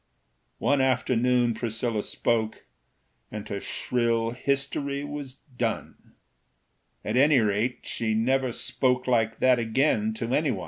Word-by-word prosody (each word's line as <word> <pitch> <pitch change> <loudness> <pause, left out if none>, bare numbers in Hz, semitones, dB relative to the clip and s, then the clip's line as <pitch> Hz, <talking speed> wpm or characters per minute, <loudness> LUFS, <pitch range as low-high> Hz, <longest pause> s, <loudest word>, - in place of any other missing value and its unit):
One 145 -1 +2
afternoon 125 -2 +2
Priscilla 115 -1 -2
spoke, 110 0 -1 0.7
And 105 -1 -6
her 100 - -3
shrill 115 -2 0
history 140 +2 -1
was 145 -2 -6
done; 125 -5 -5 0.9
At 110 +3 -1
any 140 +1 +5
rate, 110 +3 0
she 110 -2 -2
never 130 +3 +1
spoke 125 +2 0
Like 115 -3 +1
that 130 -1 +5
again 110 -2 +1
to 115 +2 -3
anyone. 135 -10 +1
125 Hz, 120 wpm, -26 LUFS, 115-130 Hz, 0.9 s, any